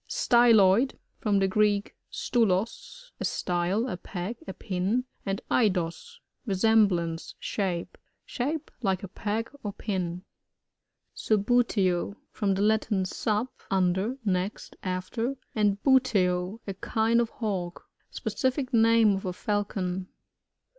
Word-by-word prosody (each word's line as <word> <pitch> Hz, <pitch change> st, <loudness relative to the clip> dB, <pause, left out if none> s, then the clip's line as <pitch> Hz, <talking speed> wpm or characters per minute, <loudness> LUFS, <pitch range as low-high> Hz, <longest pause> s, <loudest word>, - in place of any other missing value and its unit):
Styloid.— 235 Hz, 0 st, +4 dB, 0.2 s
From 205 Hz, -2 st, +1 dB
the 195 Hz, 0 st, +3 dB
Greek, 205 Hz, 0 st, +1 dB, 0.2 s
MtuloB^ 235 Hz, -, -1 dB
a -, -, -3 dB
style, 180 Hz, +6 st, 0 dB
a 180 Hz, -, -3 dB
peg, 185 Hz, +5 st, -5 dB
a 190 Hz, -, -4 dB
pin, 195 Hz, +8 st, -1 dB, 0.2 s
and 195 Hz, 0 st, -2 dB
eidaa^ 195 Hz, -, 0 dB, 0.3 s
re 195 Hz, -, 0 dB
semblance, 185 Hz, -6 st, +2 dB
diape. 185 Hz, -5 st, -2 dB, 0.4 s
Shaped 285 Hz, +5 st, -3 dB
like 190 Hz, -4 st, 0 dB
a -, -, -4 dB
peg 215 Hz, +4 st, -3 dB
or 205 Hz, -2 st, -4 dB
pin. 180 Hz, -4 st, -3 dB, 0.9 s
Subbuteo. 205 Hz, -4 st, +1 dB
— -, -, -46 dB
From 200 Hz, -2 st, 0 dB
the 195 Hz, -, 0 dB
Latin, 215 Hz, -2 st, +2 dB
stf6, 210 Hz, +5 st, -1 dB, 0.2 s
un 185 Hz, -2 st, +3 dB
der, 210 Hz, +8 st, -2 dB
next, 185 Hz, +1 st, -2 dB
after, 200 Hz, +8 st, -2 dB, 0.2 s
and 205 Hz, -2 st, +2 dB
buteo, 205 Hz, -7 st, +2 dB
a 195 Hz, -, -4 dB
kind 225 Hz, +4 st, +1 dB
of 235 Hz, -, -1 dB
Hawk. 190 Hz, -7 st, -4 dB, 0.2 s
Specific 260 Hz, 0 st, -2 dB
name 225 Hz, -1 st, +5 dB
of 195 Hz, -, -5 dB
a 180 Hz, -, -2 dB
Falcon. 190 Hz, -2 st, -2 dB
205 Hz, 125 wpm, -27 LUFS, 185-230 Hz, 0.9 s, name